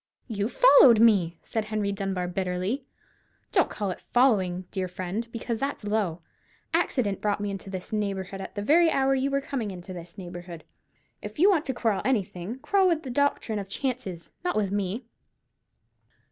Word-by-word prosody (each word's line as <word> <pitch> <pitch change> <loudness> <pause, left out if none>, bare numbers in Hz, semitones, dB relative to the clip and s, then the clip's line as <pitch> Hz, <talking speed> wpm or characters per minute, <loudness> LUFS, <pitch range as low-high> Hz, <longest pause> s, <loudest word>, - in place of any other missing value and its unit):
"You 210 -2 -2
followed 270 - +7
me," 195 -7 +4
said 220 -2 -2
Henry 215 -2 -1
Dunbar, 195 -2 -2
bitterly. 185 +8 -2 0.6
"Don't - - +3
call 205 -3 -3
it - - -7
following, 190 -8 +3
dear 190 -2 -2
friend, 185 +5 -4
because 230 0 -3
that's 275 -3 -3
low. 205 -6 -1 0.5
Accident 255 - +1
brought 205 -1 0
me 205 0 -2
into 195 0 -7
this 190 +2 -7
neighbourhood 195 -2 -2
at 190 - -8
the 205 - -3
very 330 +8 +5
hour 270 -2 +2
you 270 +1 +1
were 275 0 0
coming 250 -6 -3
into 185 0 -8
this 170 -1 -10
neighbourhood. 175 -3 -8 0.6
If - - -8
you 380 +6 +6
want 325 -5 +1
to 265 - -2
quarrel 220 -5 +1
with - - -2
anything, 205 -3 -1
quarrel 385 +8 +2
with 330 -3 +1
the 260 - -5
doctrine 245 -5 0
of 195 -1 -7
chances, 195 - -4
not 360 - -1
with 205 -3 0
me." 205 +4 -2
205 Hz, 175 wpm, -27 LUFS, 185-255 Hz, 0.6 s, followed